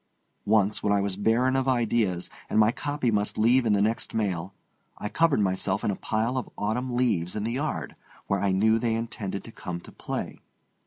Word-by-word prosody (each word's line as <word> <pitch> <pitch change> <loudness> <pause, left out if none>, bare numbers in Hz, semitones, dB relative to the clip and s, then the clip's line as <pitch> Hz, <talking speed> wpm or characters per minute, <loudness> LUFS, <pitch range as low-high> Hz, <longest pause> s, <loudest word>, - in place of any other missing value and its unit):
Once, 105 -1 +3
when 105 - +1
I 100 - +4
was 100 -1 -1
barren 115 +6 +2
of 135 0 +1
ideas, 115 -7 +1 0.2
and - - 0
my 110 +1 +6
copy 145 -1 -1
must 105 -1 0
leave 120 +3 +4
in 105 - +4
the 100 0 +3
next 110 +2 -1
mail, 95 -4 -2 0.4
I 105 - -4
covered 165 -6 +3
myself 95 0 0
in - - +1
a - - -2
pile 115 +6 -1
of 120 - -7
autumn 120 +4 -1
leaves 95 -9 +1
in 105 - -2
the 115 - -1
yard, 120 - -3 0.3
where 100 - 0
I 100 0 +1
knew 110 +4 +3
they 115 -1 0
intended 110 -4 -4
to 115 - -10
come 90 -5 -6
to - - -12
play. - - -5
110 Hz, 205 wpm, -27 LUFS, 100-120 Hz, 0.4 s, my